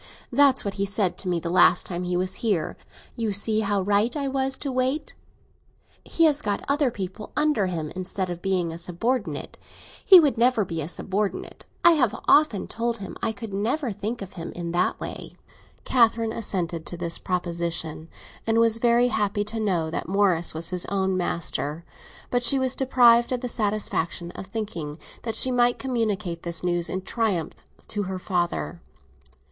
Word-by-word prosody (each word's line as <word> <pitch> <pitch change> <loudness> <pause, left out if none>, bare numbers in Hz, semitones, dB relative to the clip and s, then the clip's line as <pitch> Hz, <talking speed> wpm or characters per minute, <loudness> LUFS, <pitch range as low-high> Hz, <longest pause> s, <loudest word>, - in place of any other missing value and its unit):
That's 275 -1 +4
what 200 - -2
he - - +2
said 195 -2 0
to 190 - -5
me 175 -1 +1
the 170 0 -4
last 185 - +5
time 175 -1 -4
he 180 0 -1
was 185 +1 -1
here—'You 215 +3 -3
see 215 +2 +3
how 200 -2 0
right 205 +6 +1
I 280 -1 -2
was 270 0 -1
to 280 - -4
wait!' 260 +4 -1 0.9
He 330 - 0
has 300 -2 +3
got 205 -5 -2
other 280 -1 +2
people 200 0 -7
under 300 -10 +2
him, 160 -4 -4
instead 185 +1 -3
of 175 -1 -6
being 180 -4 0
a 165 - -8
subordinate. 180 - -3 0.4
He 380 -3 +9
could 285 -7 +2
never 235 -3 +3
be 165 -2 -4
a 145 - -3
subordinate; 195 +3 -3 0.2
I 345 - +9
have 255 -8 +1
often 290 -10 +4
told 235 0 -2
him 195 -3 -8
I 225 - 0
could 215 -1 -8
never 235 +6 -1
think 210 +3 -4
of 190 - -11
him 170 -2 -7
in 170 -1 -5
that 175 +1 0
way." - - -7 0.5
Catherine 230 -2 +3
assented 175 -7 -3
to 175 - -5
this 170 -1 -1
proposition, 170 -3 -2 0.4
and 225 0 +2
was 230 0 +4
very 240 +1 +4
happy 205 -2 0
to 220 +2 -3
know 175 -7 0
that - - -3
Morris 185 -5 +2
was 165 +1 0
his 180 -1 +1
own 190 -1 0
master; 170 -3 -2 0.5
but 245 - +2
she 260 +3 +5
was 260 -1 +1
deprived 240 -3 +4
of 250 -1 -1
the 250 - -2
satisfaction 200 -6 -1
of 190 - -9
thinking 190 -8 -5 0.2
that 225 -2 -3
she 255 +3 +4
might 245 -1 +3
communicate 215 -9 -2
this 170 -1 -2
news 175 -1 0
in 185 0 -3
triumph 195 -7 -2 0.2
to 210 - -2
her 190 - -3
father. 175 -2 -2
205 Hz, 180 wpm, -25 LUFS, 175-235 Hz, 0.9 s, He